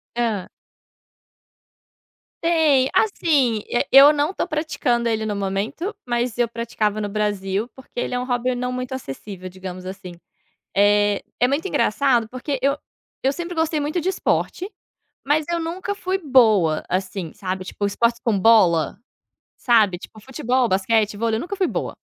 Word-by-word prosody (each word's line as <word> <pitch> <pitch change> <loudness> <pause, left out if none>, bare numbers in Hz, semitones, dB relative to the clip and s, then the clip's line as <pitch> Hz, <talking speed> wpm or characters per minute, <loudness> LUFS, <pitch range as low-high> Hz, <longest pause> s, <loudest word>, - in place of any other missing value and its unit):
Hã. 225 -6 -1 2.0
Tem. 310 -6 +3
Assim, 285 - +2
e 240 - +1
eu 275 +3 +9
não 295 +3 0
estou - - -3
praticando 290 -6 -1
ele 220 -1 -1
no 210 -1 -2
momento, 200 - -3
mas 240 -1 -1
eu 240 - +2
praticava 220 -2 -2
no 205 - -3
Brasil, 205 0 -1
porque 265 -2 -9
ele 245 - -2
é 245 - 0
um 250 - -3
hobby 250 0 0
não 250 +1 -2
muito 250 0 -4
acessível, 185 - -7
digamos 185 0 -8
assim. 190 -1 -8 0.6
Eh, 205 0 +3 0.2
é 245 - +4
muito 285 +7 -1
engraçado, 245 - +1
porque 255 +3 -4
eu 280 +1 +2 0.5
eu 270 - +2
sempre 345 +2 -5
gostei 320 -1 0
muito 300 +5 -1
de 355 - -2
esporte, 380 0 -1 0.6
mas 295 +2 +2
eu 340 - 0
nunca 350 +5 -3
fui 380 -1 -2
boa 220 - +3
assim, 185 -2 -3
sabe, 185 -1 -4
tipo, 205 +2 -4
esportes 235 +3 +1
com 225 -4 +1
bola. 190 -7 +4 0.6
Sabe, 215 -8 +3
tipo: 215 +4 -13
futebol, 250 +1 0
basquete, 210 +2 +1
vôlei, 225 +1 0
eu - - -2
nunca 380 +7 -5
fui 380 -2 +1
boa. - - -4
235 Hz, 160 wpm, -22 LUFS, 205-285 Hz, 2.0 s, eu